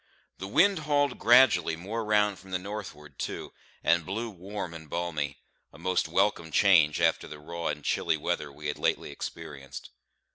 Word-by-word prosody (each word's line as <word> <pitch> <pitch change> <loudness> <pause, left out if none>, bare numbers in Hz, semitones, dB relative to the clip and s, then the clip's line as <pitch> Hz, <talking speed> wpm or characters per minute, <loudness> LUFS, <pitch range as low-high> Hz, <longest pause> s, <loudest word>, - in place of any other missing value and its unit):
The 95 - -5
wind 195 - +4
hauled 145 -3 +1
gradually 115 -9 +5
more 105 +7 -4
round 105 -2 +2
from 95 - -15
the 95 - 0
northward 90 -7 -8
too, - - -5 0.3
and 85 0 +3
blew 110 +7 -4
warm 95 -1 -6
and 80 -2 -10
balmy; 75 -5 -2 0.3
a - - -15
most 90 +1 0
welcome 90 -1 +1
change 80 -5 +4
after - - +2
the 75 - -9
raw 85 +3 -5
and 75 -1 -3
chilly - - +1
weather 70 - -2
we 75 +2 -12
had 75 - -2
lately - - 0
experienced. 75 -5 -8
90 Hz, 170 wpm, -28 LUFS, 75-105 Hz, 0.3 s, gradually